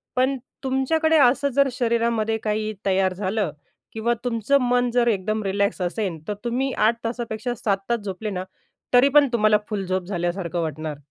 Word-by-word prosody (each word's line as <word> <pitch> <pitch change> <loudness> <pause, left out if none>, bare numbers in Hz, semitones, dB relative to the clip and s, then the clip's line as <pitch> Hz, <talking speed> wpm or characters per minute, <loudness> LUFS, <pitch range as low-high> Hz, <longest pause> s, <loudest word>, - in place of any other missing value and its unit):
पण 260 +2 +2 0.3
तुमच्याकडे 315 +5 +2
असं 280 +1 +4
जर 280 0 +5
शरीरामध्ये 230 -2 0
काही 215 0 -1
तयार 190 -1 +2
झालं 195 -1 -1 0.4
किंवा 225 +2 0
तुमचं 240 +3 +2
मन 245 0 +2
जर 240 0 +2
एकदम 215 0 0
रिलॅक्स 200 0 0
असेन, 180 -1 -2
तर 210 - -1
तुम्ही 250 +3 -1
8 225 +2 +3
तासापेक्षा 230 0 -3
7 200 -4 0
तास 235 -1 +1
झोपले 205 +1 -5
ना, 185 -2 -3 0.5
तरी 250 +3 +6
पण 290 0 +6
तुम्हाला 215 -2 +4
फुल 205 -3 -3
झोप 185 0 -1
झाल्यासारखं 175 -2 -2
वाटणार. 155 -1 -4
220 Hz, 160 wpm, -23 LUFS, 195-245 Hz, 0.5 s, तरी